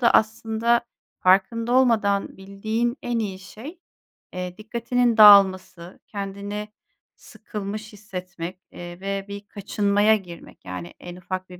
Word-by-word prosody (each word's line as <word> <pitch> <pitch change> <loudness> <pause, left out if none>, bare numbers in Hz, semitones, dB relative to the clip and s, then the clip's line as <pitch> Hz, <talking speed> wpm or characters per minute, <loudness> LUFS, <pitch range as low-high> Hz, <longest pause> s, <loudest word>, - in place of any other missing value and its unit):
da 235 - +5
aslında 225 +2 +2 0.4
farkında 210 +6 +3
olmadan 220 -6 +2
bildiğin 220 +6 -2
en 240 -1 -1
iyi 195 -4 -3
şey, 265 - -11 0.5
eee, 180 0 -5
dikkatinin 235 +2 0
dağılması, 190 -4 +6
kendini 200 +1 -5 0.5
sıkılmış 210 +1 -7
hissetmek, 185 -3 -7
eee, 175 0 -9
ve 195 0 -3
bir 200 0 -8
kaçınmaya 205 +1 +2
girmek. 180 -5 -10
Yani 90 -2 -7
en 175 0 -9
ufak 185 +1 -6
bir 180 -1 -12
200 Hz, 120 wpm, -24 LUFS, 185-220 Hz, 0.5 s, dağılması